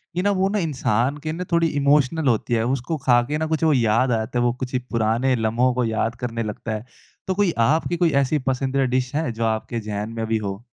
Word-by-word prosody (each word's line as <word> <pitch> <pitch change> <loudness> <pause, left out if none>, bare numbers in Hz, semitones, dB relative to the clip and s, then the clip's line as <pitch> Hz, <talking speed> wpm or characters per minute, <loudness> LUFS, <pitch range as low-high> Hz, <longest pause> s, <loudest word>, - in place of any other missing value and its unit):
कि 180 - +1
न - - +2
वो 195 - +2
ना 210 +1 0
इंसान 135 - 0
के 155 - -2
ना 175 +3 -4
थोड़ी 170 -1 +3
इमोशनल 145 +1 +2
होती 120 0 +1
है 115 - +2
उसको 135 +5 -1
खा 120 -2 +5
के 150 - 0
ना 160 - -1
कुछ 160 0 -1
वो 155 -2 +4
याद 120 +1 +2
आ 115 - +3
जाता 120 +2 -2
है, - - +2
वो 120 - +2
कुछ 130 0 -5 0.2
पुराने 115 +3 +1
लम्हों 115 +2 +1
को 125 - 0
याद 115 +1 -1
करने 115 -2 -3
लगता 110 +1 -5
है। 110 +2 -7 0.4
तो 190 - 0
कोई 200 -3 +2 0.2
आपकी 160 +3 +1
कोई 170 -1 +2
ऐसी 145 +3 0
पसंदीदा 135 +1 +1
डिश 130 0 -1
है, 150 -6 0
जो 115 +1 -4
आपके 110 +1 -2
ज़हन 105 0 -4
में 115 - -2
अभी 110 0 0
हो? 100 0 -5
125 Hz, 245 wpm, -22 LUFS, 115-150 Hz, 0.4 s, खा